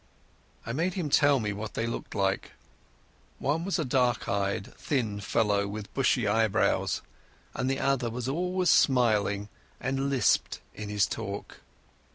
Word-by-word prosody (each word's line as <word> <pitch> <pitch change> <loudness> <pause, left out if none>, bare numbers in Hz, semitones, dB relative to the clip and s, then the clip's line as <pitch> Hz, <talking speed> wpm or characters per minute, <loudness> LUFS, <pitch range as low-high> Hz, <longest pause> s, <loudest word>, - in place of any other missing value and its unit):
I 115 - -3
made 170 +6 0
him 165 -7 -2
tell 145 -2 +5
me 105 -3 -2
what 105 +2 -6
they 115 - -1
looked 115 - -5
like. 95 -1 0 0.8
One 155 +4 0
was 195 +2 0
a 160 - -1
dark 125 -2 +1
eyed 100 0 -1
thin 110 -8 -1
fellow 100 0 +1
with 100 0 -7
bushy 130 -3 +2
eyebrows, 110 0 +1 0.5
the 135 +1 0
other 135 -3 +1
was 120 +2 -4
always 180 +5 +1
smiling 105 -6 +3 0.3
and 135 +2 -1
lisped 135 -3 +2
in 105 -1 -7
his 105 -1 +2
talk. 100 -3 -6
120 Hz, 145 wpm, -28 LUFS, 105-135 Hz, 0.8 s, tell